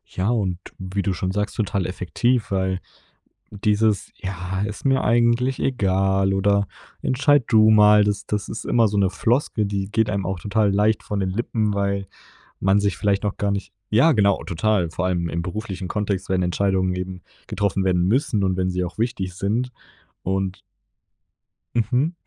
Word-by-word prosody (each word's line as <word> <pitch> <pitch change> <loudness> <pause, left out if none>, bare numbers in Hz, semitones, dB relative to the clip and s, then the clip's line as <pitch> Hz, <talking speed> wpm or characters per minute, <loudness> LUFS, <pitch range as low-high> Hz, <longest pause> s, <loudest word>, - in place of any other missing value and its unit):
Ja, 95 +4 0
und 100 -7 0 0.2
wie 95 +1 -3
du 95 - 0
schon 90 +1 -2
sagst, 105 +1 -2
total 100 -4 -1
effektiv, 105 +5 0
weil 95 -1 0 0.7
dieses: 105 0 +1
„Ja, 95 +1 -4
ist 105 +5 -5
mir 135 0 +3
eigentlich 120 +3 +2
egal 95 -5 +1
oder 100 0 +2 0.4
entscheid 140 +1 +3
du 110 -2 +5
mal“, 105 -1 +6
das 105 0 -1
das 105 -1 -3
ist 110 - -6
immer 115 -2 +3
so 105 - -2
'ne 95 -2 +2
Floskel, 115 +2 0
die 100 0 -3
geht 110 0 +1
einem 100 -3 -1
auch 95 -1 -3
total 105 +2 +1
leicht 105 +1 +2
von 105 -1 -3
den 95 -1 0
Lippen, 110 +1 -1
weil 100 -1 -1 0.5
man 95 +1 +3
sich 100 -1 0
vielleicht 100 -1 +1
noch 105 - -2
gar 100 0 0
nicht 100 0 -4 0.2
ja, 140 +9 +5
genau, 100 -3 +2
total, 90 0 0
vor 90 +3 -3
allem 85 -2 0
im 85 +1 -2
beruflichen 95 0 -5
Kontext, 100 -2 -2
wenn 95 -1 +1
Entscheidungen 95 0 +1
eben 90 0 -5 0.3
getroffen 100 -2 0
werden 90 -1 +2
müssen 115 -1 +1
und 95 -1 +1
wenn 95 0 0
sie 90 0 -1
auch 85 - -8
wichtig 110 -5 -2
sind 110 +6 -1 0.5
und 95 0 -2 1.2
Mhm. 125 +9 +1
100 Hz, 170 wpm, -22 LUFS, 95-110 Hz, 1.2 s, mal